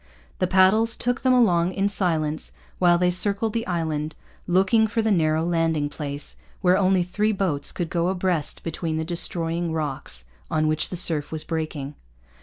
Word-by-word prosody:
The 185 Hz, -, +2 dB
paddles 195 Hz, +5 st, +4 dB
took 245 Hz, +1 st, -1 dB
them 260 Hz, -, +3 dB
along 185 Hz, -8 st, +3 dB
in 195 Hz, +2 st, +1 dB
silence 160 Hz, -6 st, -1 dB, 0.3 s
while 175 Hz, -1 st, +5 dB
they 180 Hz, 0 st, +2 dB
circled 205 Hz, +4 st, 0 dB
the 230 Hz, -1 st, -2 dB
island, 160 Hz, -3 st, -2 dB, 0.3 s
looking 190 Hz, +5 st, +3 dB
for 225 Hz, +1 st, -1 dB
the 220 Hz, -, +1 dB
narrow 160 Hz, -3 st, +2 dB
landing 165 Hz, -3 st, +1 dB
place, 145 Hz, -1 st, -6 dB, 0.2 s
where 180 Hz, -2 st, +4 dB
only 190 Hz, -2 st, +3 dB
three 210 Hz, +5 st, 0 dB
boats 185 Hz, -8 st, -1 dB
could 175 Hz, -3 st, -4 dB
go 170 Hz, 0 st, +1 dB
abreast 180 Hz, -4 st, -1 dB
between 165 Hz, -1 st, -3 dB
the 160 Hz, -, -2 dB
destroying 170 Hz, 0 st, -2 dB
rocks 135 Hz, -, -4 dB, 0.2 s
on 155 Hz, 0 st, +1 dB
which 155 Hz, 0 st, 0 dB
the 180 Hz, -, -4 dB
surf 160 Hz, -4 st, +1 dB
was 160 Hz, -1 st, -3 dB
breaking. 155 Hz, -3 st, -4 dB
175 Hz, 170 wpm, -24 LUFS, 155-190 Hz, 0.3 s, while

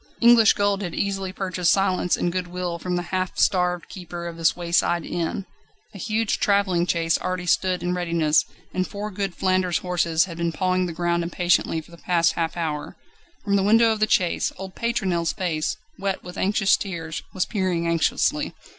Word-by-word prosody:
English 235 Hz, -2 st, +7 dB
gold 200 Hz, -1 st, +1 dB
had 175 Hz, -4 st, -4 dB
easily 195 Hz, -2 st, -2 dB
purchased 185 Hz, -3 st, 0 dB
silence 185 Hz, -2 st, +2 dB
and 175 Hz, -, 0 dB
good 180 Hz, 0 st, -2 dB
will 175 Hz, -1 st, -4 dB
from 180 Hz, +1 st, -2 dB
the 175 Hz, -, -1 dB
half 185 Hz, -1 st, -1 dB
starved 180 Hz, -2 st, +1 dB
keeper 175 Hz, -2 st, -8 dB
of 170 Hz, -1 st, -5 dB
this 165 Hz, -1 st, +2 dB
wayside 175 Hz, -1 st, +1 dB
inn. 175 Hz, +2 st, -3 dB, 0.5 s
A 200 Hz, -, -10 dB
huge 215 Hz, +3 st, 0 dB
travelling 190 Hz, -4 st, +2 dB
chaise 165 Hz, -1 st, +1 dB
already 185 Hz, -1 st, -3 dB
stood 185 Hz, +1 st, +1 dB
in 180 Hz, 0 st, 0 dB
readiness, 170 Hz, -4 st, +2 dB, 0.3 s
and 185 Hz, 0 st, -1 dB
four 210 Hz, +1 st, -5 dB
good 195 Hz, -1 st, -3 dB
Flanders 185 Hz, -2 st, +1 dB
horses 170 Hz, -2 st, +1 dB
had 170 Hz, -3 st, -9 dB
been 170 Hz, 0 st, 0 dB
pawing 185 Hz, 0 st, +1 dB
the -, -, -4 dB
ground 170 Hz, +1 st, 0 dB
impatiently 170 Hz, -1 st, +1 dB
for 160 Hz, -, -19 dB
the 170 Hz, -, -13 dB
past 170 Hz, -2 st, +2 dB
half 165 Hz, 0 st, -2 dB
hour. 150 Hz, -3 st, -3 dB, 0.5 s
From 200 Hz, -1 st, +1 dB
the 200 Hz, -, +3 dB
window 225 Hz, +3 st, +5 dB
of 220 Hz, -, -1 dB
the 215 Hz, -, +2 dB
chaise 180 Hz, -3 st, +2 dB
old 190 Hz, 0 st, -7 dB
Pétronelle's 190 Hz, -8 st, -1 dB
face, 160 Hz, -4 st, -2 dB, 0.2 s
wet 195 Hz, -1 st, -2 dB
with 180 Hz, +1 st, -9 dB
anxious 195 Hz, +1 st, +3 dB
tears, 165 Hz, -5 st, -5 dB
was 185 Hz, -, 0 dB
peering 185 Hz, -5 st, -1 dB
anxiously. 165 Hz, -2 st, +1 dB
180 Hz, 185 wpm, -24 LUFS, 170-195 Hz, 0.5 s, English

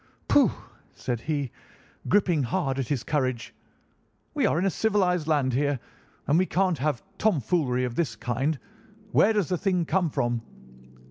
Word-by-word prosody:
"'Pooh!' -, -, +5 dB, 0.5 s
said 120 Hz, -2 st, -3 dB
he, 145 Hz, -3 st, -2 dB, 0.6 s
gripping 185 Hz, -6 st, +3 dB
hard 135 Hz, +1 st, -1 dB
at 130 Hz, -, -2 dB
his 135 Hz, -5 st, -1 dB
courage. 130 Hz, -5 st, -1 dB, 0.8 s
'We 285 Hz, -7 st, +2 dB
are -, -, +1 dB
in 180 Hz, -, +1 dB
a 195 Hz, -, +2 dB
civilised 180 Hz, -6 st, +1 dB
land 145 Hz, -5 st, +2 dB
here, 140 Hz, +1 st, +1 dB, 0.5 s
and 150 Hz, +4 st, +3 dB
we 185 Hz, -, +2 dB
can't 185 Hz, -3 st, +1 dB
have 150 Hz, +6 st, -1 dB, 0.2 s
tomfoolery 145 Hz, -, +1 dB
of 125 Hz, -2 st, -2 dB
this 130 Hz, -5 st, -1 dB
kind. 130 Hz, +7 st, -1 dB, 0.5 s
Where 215 Hz, -, +5 dB
does 205 Hz, -6 st, 0 dB
the 180 Hz, -2 st, 0 dB
thing 180 Hz, -4 st, +1 dB
come 175 Hz, +1 st, +1 dB
from? 120 Hz, -4 st, -1 dB
150 Hz, 155 wpm, -26 LUFS, 130-180 Hz, 0.8 s, Pooh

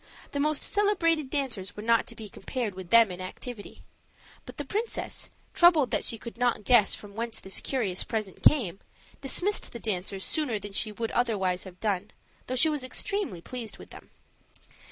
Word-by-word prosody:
The 285 Hz, -, -2 dB
most 300 Hz, 0 st, +2 dB
celebrated 335 Hz, -8 st, +2 dB
dancers 240 Hz, -10 st, -2 dB
were 210 Hz, -, -7 dB
not 230 Hz, 0 st, +3 dB
to -, -, -6 dB
be 220 Hz, -, -8 dB
compared 230 Hz, 0 st, -4 dB
with 185 Hz, -2 st, -9 dB
them 230 Hz, -4 st, +7 dB
in 180 Hz, 0 st, -7 dB
activity. 205 Hz, +4 st, -7 dB, 0.6 s
But -, -, -10 dB
the 290 Hz, -, -4 dB
princess, 435 Hz, -, -2 dB, 0.2 s
troubled 330 Hz, -6 st, +5 dB
that -, -, +1 dB
she 230 Hz, -, 0 dB
could 235 Hz, +1 st, -9 dB
not 245 Hz, -3 st, +1 dB
guess 230 Hz, -3 st, +5 dB
from 205 Hz, -1 st, -11 dB
whence 230 Hz, +1 st, -3 dB
this 190 Hz, -, -3 dB
curious 210 Hz, -9 st, -1 dB
present 215 Hz, -4 st, -4 dB
came, 205 Hz, -, +4 dB, 0.4 s
dismissed 355 Hz, +9 st, +3 dB
the 235 Hz, -, -6 dB
dancers 195 Hz, -2 st, -2 dB
sooner 295 Hz, -9 st, 0 dB
than 205 Hz, -1 st, -7 dB
she 215 Hz, +2 st, +1 dB
would 225 Hz, +2 st, -3 dB
otherwise 195 Hz, -7 st, 0 dB
have 180 Hz, -1 st, -11 dB
done, 205 Hz, -2 st, -1 dB, 0.4 s
though 255 Hz, -, -2 dB
she 285 Hz, +6 st, +5 dB
was 300 Hz, -4 st, -1 dB
extremely 295 Hz, -, -1 dB
pleased 235 Hz, 0 st, -6 dB
with -, -, -13 dB
them. -, -, -12 dB
230 Hz, 180 wpm, -28 LUFS, 200-280 Hz, 0.6 s, them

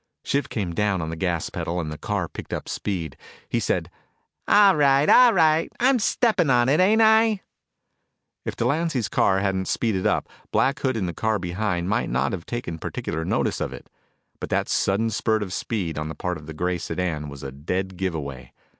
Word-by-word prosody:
Shiv 140 Hz, 0 st, -1 dB
came 95 Hz, -7 st, -3 dB
down 100 Hz, +1 st, +1 dB
on 80 Hz, -1 st, -3 dB
the -, -, -4 dB
gas 85 Hz, 0 st, -2 dB
pedal 85 Hz, +1 st, -3 dB
and 80 Hz, -3 st, -4 dB
the -, -, -5 dB
car -, -, -2 dB
picked -, -, -8 dB
up -, -, -4 dB
speed. 85 Hz, -8 st, -3 dB, 0.3 s
He -, -, 0 dB
said, -, -, -1 dB, 0.6 s
"All 205 Hz, -2 st, +6 dB
right, 140 Hz, 0 st, +4 dB
all 250 Hz, -1 st, +7 dB
right! 160 Hz, -4 st, +3 dB
I'm 255 Hz, +1 st, +4 dB
steppin' 215 Hz, -, +2 dB
on 120 Hz, 0 st, +4 dB
it, 150 Hz, -, +3 dB
ain't 215 Hz, +5 st, +5 dB
I?" 220 Hz, -2 st, +4 dB, 1.0 s
If -, -, -4 dB
Delancy's 145 Hz, -7 st, 0 dB
car 95 Hz, -3 st, +2 dB
hadn't 95 Hz, -1 st, -1 dB
speeded 105 Hz, -6 st, 0 dB
up, -, -, 0 dB, 0.2 s
Black 140 Hz, +1 st, +2 dB
Hood 130 Hz, -3 st, 0 dB
in 100 Hz, -, -1 dB
the 85 Hz, -, -3 dB
car 110 Hz, +5 st, 0 dB
behind 90 Hz, -1 st, -2 dB
might 110 Hz, +5 st, 0 dB
not -, -, 0 dB
have 90 Hz, -4 st, -5 dB
taken 100 Hz, -9 st, -4 dB
particular 80 Hz, +1 st, -4 dB
notice -, -, -1 dB
of -, -, -2 dB
it. 60 Hz, -, -12 dB, 0.5 s
But -, -, -5 dB
that -, -, 0 dB
sudden 110 Hz, +4 st, +1 dB
spurt 110 Hz, -1 st, 0 dB
of 95 Hz, -2 st, -6 dB
speed 90 Hz, -10 st, -3 dB
on 75 Hz, 0 st, -4 dB
the 80 Hz, -, -6 dB
part 90 Hz, -3 st, -3 dB
of 75 Hz, -, -14 dB
the 80 Hz, -, -8 dB
gray 90 Hz, +2 st, -1 dB
sedan 80 Hz, -3 st, -3 dB
was 70 Hz, -1 st, -10 dB
a 70 Hz, -, -5 dB
dead 90 Hz, +7 st, -3 dB
give 90 Hz, -1 st, -2 dB
away. 65 Hz, -5 st, -7 dB
95 Hz, 200 wpm, -24 LUFS, 85-135 Hz, 1.0 s, all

